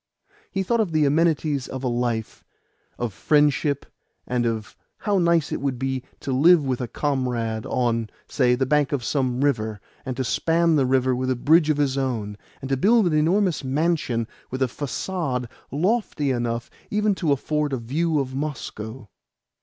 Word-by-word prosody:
He 195 - -1
thought 235 +5 +1
of 200 -7 0
the 155 -1 +3
amenities 150 -2 +1
of 130 0 -6
a - - 0
life, 120 -2 -2 0.5
of 120 -4 -3
friendship, 145 - +2 0.4
and 125 -1 0
of 110 -2 -3 0.2
how 205 -2 +1
nice 170 -3 +2
it - - -2
would 135 -3 -1
be 130 0 -2 0.2
to 135 - -3
live 155 +4 +5
with 130 -1 -1
a 125 - -2
comrade 120 -5 -2
on, 115 -3 0 0.2
say, 125 -3 +2
the 130 +1 0
bank 145 +1 +2
of 135 -4 -1
some 130 -1 0
river, 110 -7 0 0.2
and 130 -2 -5
to 130 - 0
span 165 +5 +2
the 135 -3 +3
river 130 -1 +2
with 130 +1 -2
a 130 - +2
bridge 155 +5 +4
of 155 - +2
his 140 -2 +1
own, 115 -6 -2 0.3
and 135 - -4
to 135 - +1
build 220 - +4
an 170 - +1
enormous 170 +3 +2
mansion 135 -5 0 0.2
with 130 +1 -1
a - - +2
facade 140 -1 -3 0.2
lofty 165 - 0
enough 120 -1 -2 0.2
even 210 0 +2
to 170 -5 0
afford 150 +1 0
a 135 - 0
view 155 +8 -1
to 130 0 -9
Moscow. 125 -5 -5
135 Hz, 175 wpm, -24 LUFS, 125-155 Hz, 0.5 s, live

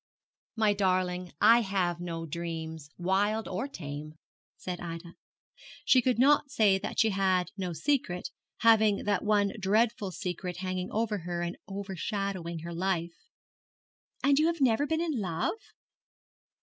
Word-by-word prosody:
'My 215 -2 +3
darling, 185 -2 0
I 230 +1 +7
have 185 -4 -1
no 165 -2 -4
dreams, 160 -2 -5
wild 200 +5 +1
or 190 +9 -3
tame,' 155 - -7 0.4
said 180 -1 -5
Ida. 170 0 -7 0.7
She 255 - +6
could 250 -1 +1
not 280 +2 +4
say 210 -8 +3
that - - -4
she 220 -1 +4
had 190 -2 +1
no 185 -3 -3
secret, 180 - -1 0.3
having 220 -3 +5
that 205 -2 0
one 205 -2 +2
dreadful 210 +1 +1
secret 180 0 -4
hanging 185 0 -3
over 215 -1 -1
her 175 0 -3
and 175 +1 -3
overshadowing 195 -3 -4
her 170 +1 -6
life. 170 -1 -1 1.1
'And 280 0 +4
have 330 +1 +2
you - - +3
never 260 +3 +3
been 320 +1 0
in 315 -7 -1
love?' 180 - -2
190 Hz, 140 wpm, -29 LUFS, 175-220 Hz, 1.1 s, I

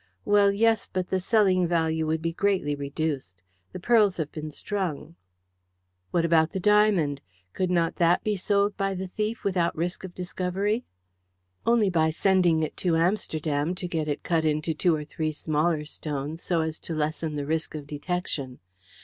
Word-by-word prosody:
Well, 205 -1 +5
yes, 225 +1 +2
but 185 -1 -2
the 190 - +1
selling 185 -3 +3
value 160 -2 0
would 160 0 -1
be 165 0 -1
greatly 190 -6 +1
reduced. 140 - -4 0.3
The - - -7
pearls 210 -1 +3
have 155 -3 -3
been 155 -1 -6
strung." 165 -2 -4 0.9
"What 170 -1 +1
about 160 -1 +3
the 190 - -1
diamond? 195 -8 +3 0.3
Could 185 -1 -1
not 170 -2 +1
that 175 0 +3
be 210 -1 0
sold 200 +1 +1
by 195 -1 -1
the 190 +1 -4
thief 215 +4 -3
without 180 -3 +1
risk 175 +4 -2
of 185 -2 -8
discovery?" 190 +5 -2 0.8
"Only 230 -4 +4
by 160 -2 +3
sending 175 -1 +3
it 155 - -3
to 175 -3 +1
Amsterdam 165 -3 0
to 180 0 -4
get 160 -3 -2
it 145 -1 -3
cut 165 -2 +1
into 155 +1 0
two 170 0 +2
or 150 -1 -5
three 155 +1 -2
smaller 155 +1 0
stones, 150 +1 -5
so 170 -3 0
as 160 0 -3
to 165 - -5
lessen 155 0 -2
the 145 -1 -3
risk 160 +1 -1
of 150 -2 -6
detection. 145 -3 -3
170 Hz, 175 wpm, -26 LUFS, 155-190 Hz, 0.9 s, Well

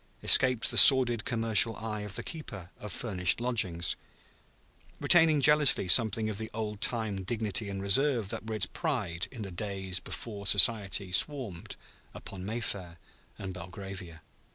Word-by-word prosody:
escaped 125 -3 +4
the - - +5
sordid 125 -5 +8
commercial 115 -1 +1
eye 110 0 -7
of 105 -2 -8
the - - -2
keeper 100 - -10
of 105 - -10
furnished 90 -7 -1
lodgings, 95 -9 -2 1.0
retaining 165 -3 +3
jealously 150 -7 +4
something 110 +4 +2
of 105 -1 -5
the 110 - -7
old 105 -2 -7
time 110 -5 -3
dignity 105 0 -4
and 100 0 -7
reserve 115 +1 0
that 110 - -5
were 110 - -5
its 105 - -1
pride 105 - -5
in 120 -5 -10
the 95 - -9
days 95 -1 -5
before 100 -4 -8
Society 100 -2 +3
swarmed 105 - -1 0.4
upon 95 -2 -11
Mayfair 100 -5 -6 0.4
and 95 -1 -9
Belgravia. 90 -2 -11
105 Hz, 145 wpm, -27 LUFS, 95-115 Hz, 1.0 s, sordid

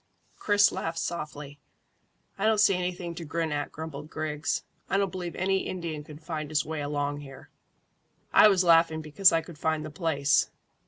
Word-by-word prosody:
Chris 205 -1 +4
laughed 165 0 -4
softly. 150 -4 -5 0.8
"I 200 - 0
don't 220 -1 +3
see 205 -1 +5
anything 180 -1 -3
to 170 0 -7
grin 165 +1 -2
at," 145 0 -2
grumbled 155 -1 -7
Griggs. 155 -1 -2 0.3
"I - - +2
don't 195 -2 +1
believe 180 -2 -5
any 190 +1 +1
Indian 165 -5 -4
could 150 +1 -12
find 155 -3 -4
his 155 -1 +1
way 155 0 -4
along 145 0 -2
here." 135 -2 -12 0.8
"I - - +8
was 190 -3 +4
laughing 165 -2 +4
because 170 +6 +4
I 165 - +2
could 160 -2 -13
find 160 -1 0
the 155 - -7
place." 150 -4 +1
160 Hz, 175 wpm, -28 LUFS, 150-180 Hz, 0.8 s, I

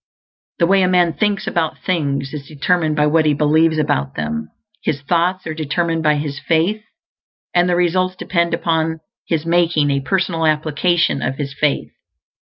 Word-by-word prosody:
The 170 - +3
way 195 +2 +3
a 185 - +3
man 175 -2 +3
thinks 205 +2 0
about 160 -2 -1
things 140 -6 -1
is 140 -3 -7
determined 155 +1 0
by 150 0 +2
what 155 +1 +3
he 150 - +3
believes 155 +2 +3
about 70 - -1
them. 75 0 -3 0.3
His 145 -2 -2
thoughts 175 +5 0
are 160 - -3
determined 165 +2 -1
by 150 -1 +3
his 145 -1 -4
faith, 175 +8 0 0.7
and 175 0 +3
the 175 - +2
results 185 +1 +1
depend 170 -2 0
upon 160 -1 -1 0.3
his 160 -2 -1
making 165 -4 +2
a 140 - +1
personal 165 +2 0
application 155 +1 +1
of 135 - -2
his 140 -1 -5
faith. 145 0 -1
160 Hz, 170 wpm, -18 LUFS, 150-175 Hz, 0.7 s, The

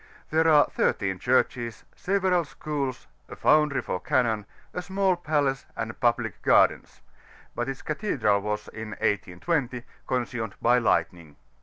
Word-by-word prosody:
There 160 +1 +3
are 150 -2 +6
13 95 -2 -1
churches, 120 -1 0
several 185 -2 +1
schools, 140 -3 -4 0.2
a - - -8
foundry 150 -4 +3
for 90 - -3
cannon, 115 -5 0 0.3
a 180 - -3
small 190 0 +1
palace, 145 -6 -1
and - - -4
public - - 0
gardens; - - +3 0.5
but 120 +2 -2
its 135 - -6
cathedral 135 - 0
was, 105 +1 -3
in 110 0 -7
1820, 120 - -1 0.2
consumed 120 -4 -2
by 120 +1 +4
lightning. 85 -9 0
130 Hz, 130 wpm, -26 LUFS, 110-155 Hz, 0.5 s, are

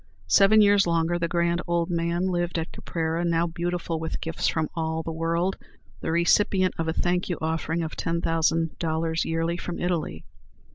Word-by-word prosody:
Seven 210 +2 +6
years 200 -2 +4
longer 170 +1 +1
the 170 - 0
grand 170 0 +1
old 170 0 0
man 170 +1 0
lived 175 -2 -1
at 165 0 -3
Caprera, 165 0 -2
now 170 -1 +2
beautified 170 -1 -3
with 160 - -3
gifts 165 - -2
from 160 -1 0
all 160 -1 -2
the 165 - -4
world, 165 +3 -1 0.4
the - - -3
recipient 185 +2 +3
of 165 - -1
a - - +1
thank 180 +1 0
offering 160 +1 -1
of 160 - -5
$10,000 165 0 0
yearly 165 +1 -1
from 175 -1 -5
Italy. 165 - -2
170 Hz, 160 wpm, -26 LUFS, 165-175 Hz, 0.4 s, Seven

